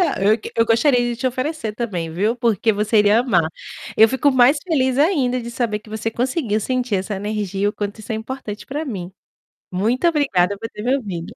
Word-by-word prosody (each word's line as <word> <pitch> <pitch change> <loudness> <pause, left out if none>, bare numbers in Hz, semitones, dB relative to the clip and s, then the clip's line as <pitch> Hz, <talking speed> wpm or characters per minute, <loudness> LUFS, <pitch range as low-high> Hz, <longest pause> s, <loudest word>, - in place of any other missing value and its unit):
a 315 - 0
eu 215 +3 +4
q - - -8
eu 230 - +4
gostaria 245 +4 +3
de 240 0 -1
te 240 - -2
oferecer, 255 -2 -2
também, 185 -9 -3
viu, 200 +8 0
porque 230 -2 +1
você 210 +2 +1
iria 210 +2 +5
amar. 180 -11 +2 0.5
Eu 220 - +7
fico 265 +4 +1
mais 260 +2 +5
feliz, 265 -7 +1
ainda, 280 -6 +2
de 235 0 -7
saber 235 -3 -1
que 215 - -19
você 220 +1 -3
conseguiu 245 -2 -1
sentir 250 -1 -1
essa 190 +3 -3
energia 200 -1 -3
e 205 - +3
o - - -2
quanto 205 +1 -5
isso 215 - -12
é - - -1
importante 220 -2 -6
pra 295 +4 -4
mim. 190 - -6 0.6
Muito 225 - +1
obrigada 205 - +2
por 225 +2 -5
ter 210 - -9
me 250 +4 +2
ouvido. 190 -10 -6
225 Hz, 215 wpm, -20 LUFS, 205-255 Hz, 0.6 s, Eu